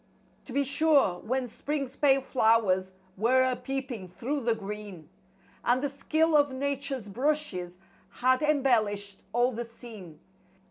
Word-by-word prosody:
To - - -9
be 280 +1 +2
sure, 280 - +3
when 255 +3 -2
spring's 275 +2 -4
pale 275 -2 +4
flowers 220 -7 +2 0.2
were 250 +5 +4
a 255 -1 +1
peeping 260 -7 -5
through 255 +11 -3
the 235 -3 +1
green, 205 -6 -8 0.5
And 245 +1 +3
the 285 - 0
skill 315 +3 +1
of 290 -2 +4
Nature's 275 -3 -3
brushes 215 -7 -1 0.3
had 255 +4 +2
em¬ 300 -2 +1
bellished 205 -6 +1
all 240 +2 +2
the 240 0 -4
scene. 220 -9 -11
250 Hz, 140 wpm, -28 LUFS, 210-275 Hz, 0.5 s, pale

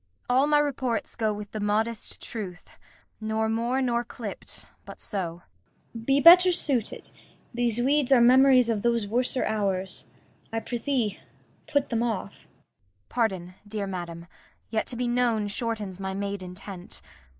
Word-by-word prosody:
All 260 +3 +4
my 300 0 +4
reports 260 -5 -1
go 220 -2 +1
with 210 0 -6
the 215 - -4
modest 215 +2 -1
truth; 195 -6 -7 0.4
Nor 220 0 -1
more 235 +4 0
nor 240 -1 +1
clipp'd, 225 -3 -7 0.2
but - - -11
so. 175 -4 -3 0.5
Cor. 230 - -7
Be 275 +2 +4
better 360 +4 +9
suited. 265 - -1 0.4
These 240 -2 0
weeds 280 +1 +2
are 265 - +7
memories 255 +1 +6
of 225 -3 0
those 235 -1 +1
worser 245 +4 0
hours. 195 -3 -1 0.4
I 225 - -1
prithee 240 -3 -1 0.5
put 285 -3 0
them 230 -1 +1
off. 230 -4 -2
Kent. - - -23 0.6
Pardon, 190 -7 -1
dear 205 -1 -3
madam. 170 -3 -6 0.5
Yet 220 -1 0
to 245 - -2
be 245 +1 -1
known 240 -3 +1
shortens 210 -3 -3
my 190 0 -3
made 200 0 -3
intent. 180 0 -8
225 Hz, 150 wpm, -27 LUFS, 200-250 Hz, 0.6 s, better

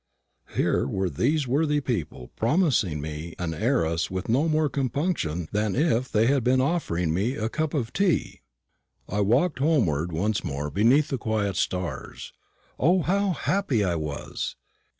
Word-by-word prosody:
Here - - +1
were 95 +4 -1
these 145 +2 +1
worthy 150 +3 +2
people 80 - -4
promising 115 - +1
me 75 +3 -6
an 85 -2 -3
heiress 85 - 0
with 95 +2 -4
no 140 +8 +2
more 155 0 +2
compunction 130 - -1
than 105 -1 0
if 130 -4 +1
they 110 +1 +3
had 135 0 +2
been 130 +2 +3
offering 110 - 0
me 105 +10 0
a 110 -2 -2
cup 155 +4 -2
of 120 -5 -2
tea. 195 -4 0 0.7
I 105 +2 -1
walked 130 - +2
homeward 95 - +1
once 105 +6 -1
more 75 -3 -3
beneath 120 - +3
the 135 - -2
quiet 105 -4 -1
stars. 90 0 -3 0.5
O, 175 +5 +3
how 195 +1 +1
happy 155 - 0
I 90 -3 +1
was! 75 -3 -4
115 Hz, 150 wpm, -26 LUFS, 90-145 Hz, 0.7 s, they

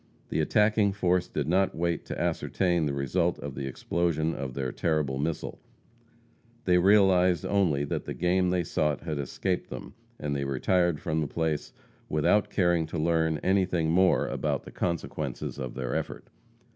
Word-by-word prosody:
The - - -1
attacking 105 +5 +3
force 90 -2 +1
did 75 -2 -3
not 95 +3 +2
wait 85 0 -1
to - - -5
ascertain 85 -4 0
the - - -1
result 85 +6 0
of 70 -2 -6
the 65 +1 -4
explosion 80 +3 -1
of 65 -3 -5
their 65 -2 -2
terrible 75 -5 0
missile. 80 +2 -3 1.1
They 90 -1 +4
realized 95 -3 +4
only 85 -8 +2
that 70 - -3
the - - -5
game 90 +1 +2
they 90 -1 +1
sought 75 -2 0
had 80 -3 -3
escaped 70 - -2
them, - - -8 0.2
and 75 -1 -3
they 70 - -1
retired 80 +5 +1
from 80 0 -1
the 75 - -1
place 80 0 -2 0.4
without 75 +7 +2
caring 85 -4 +2
to 80 - -5
learn 80 0 +1
anything 90 -4 +2
more 90 +2 +4
about - - -2
the - - -11
consequences 85 -4 -3
of 65 -2 -5
their 65 -1 -3
effort. - - -5
85 Hz, 165 wpm, -28 LUFS, 75-90 Hz, 1.1 s, They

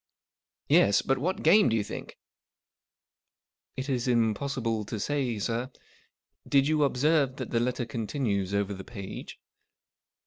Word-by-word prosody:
" - - -66 0.3
Yes. 100 0 +4
But 135 0 +1
what 180 +7 -2
game, 200 +4 +6
do 115 - +1
you 110 - +1
think? - - -8 0.6
" - - -66
" - - -51
It 130 +1 -3
is 130 -3 -1
impossible 115 -1 0
to 110 - -5
say, 130 -2 -1
sir. 115 +4 -2 0.8
Did 140 -1 +3
you 155 -1 +2
observe 140 0 +2
that 130 -3 -6
the 115 - +2
letter 120 0 -1
continues 110 -4 -2
over 100 0 0
the 95 0 -8
page 100 -4 -8
125 Hz, 150 wpm, -28 LUFS, 110-140 Hz, 0.8 s, game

